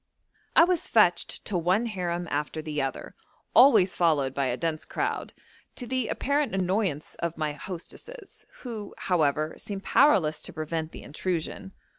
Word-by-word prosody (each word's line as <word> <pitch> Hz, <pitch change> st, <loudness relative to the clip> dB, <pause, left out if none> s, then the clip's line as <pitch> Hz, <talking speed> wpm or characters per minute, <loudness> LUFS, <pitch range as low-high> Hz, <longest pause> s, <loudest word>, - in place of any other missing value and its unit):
I -, -, +9 dB
was 350 Hz, -1 st, +1 dB
fetched 210 Hz, -6 st, +2 dB
to 205 Hz, -, -3 dB
one 180 Hz, +6 st, +2 dB
harem 175 Hz, -5 st, -3 dB
after 150 Hz, +2 st, -2 dB
the 155 Hz, -1 st, -3 dB
other, 135 Hz, -1 st, -4 dB, 0.4 s
always 235 Hz, -7 st, +6 dB
followed 150 Hz, -6 st, +2 dB
by 140 Hz, -1 st, 0 dB
a 125 Hz, 0 st, -1 dB
dense 160 Hz, 0 st, -2 dB
crowd, -, -, -3 dB, 0.4 s
to 250 Hz, -, -5 dB
the 255 Hz, -1 st, -1 dB
apparent 285 Hz, -5 st, 0 dB
annoyance 185 Hz, -4 st, -1 dB
of 170 Hz, -1 st, -3 dB
my 155 Hz, -2 st, -1 dB
hostesses, 300 Hz, -, -9 dB, 0.2 s
who, 220 Hz, -5 st, -7 dB
however, 155 Hz, -3 st, +1 dB
seemed 200 Hz, -1 st, -6 dB
powerless 180 Hz, -, +4 dB
to -, -, -6 dB
prevent 155 Hz, +1 st, -3 dB
the -, -, -10 dB
intrusion. 175 Hz, +4 st, -4 dB
175 Hz, 150 wpm, -27 LUFS, 155-215 Hz, 0.4 s, I